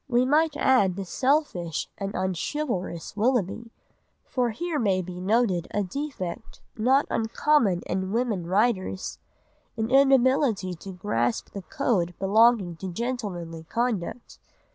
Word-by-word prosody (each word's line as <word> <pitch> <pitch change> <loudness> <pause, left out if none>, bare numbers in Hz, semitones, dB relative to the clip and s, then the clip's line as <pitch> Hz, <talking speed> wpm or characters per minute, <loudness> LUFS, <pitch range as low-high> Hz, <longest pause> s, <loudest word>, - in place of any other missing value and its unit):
We 245 -1 +3
might 300 +2 +2
add 250 -11 +3
the 195 0 -4
selfish 255 - 0
and 200 0 -5
unchivalrous 185 - -3
Willoughby, 230 0 0 0.5
for 250 -3 0
here 315 +7 -3
may 195 -6 +2
be 180 0 -7
noted 195 -3 +1
a 205 - -1
defect 220 - -5 0.2
not 260 +6 +3
uncommon 225 -4 +2
in 190 +1 -2
women 220 -7 -1
writers, 190 -1 0 0.6
an 225 +1 -2
inability 260 -7 +4
to 185 +3 -9
grasp 120 - -1
the 200 - -6
code 190 - -1
belonging 200 -3 +3
to 190 +1 -5
gentlemanly 175 -8 -4
conduct. 230 +1 -3
215 Hz, 120 wpm, -26 LUFS, 185-255 Hz, 0.6 s, inability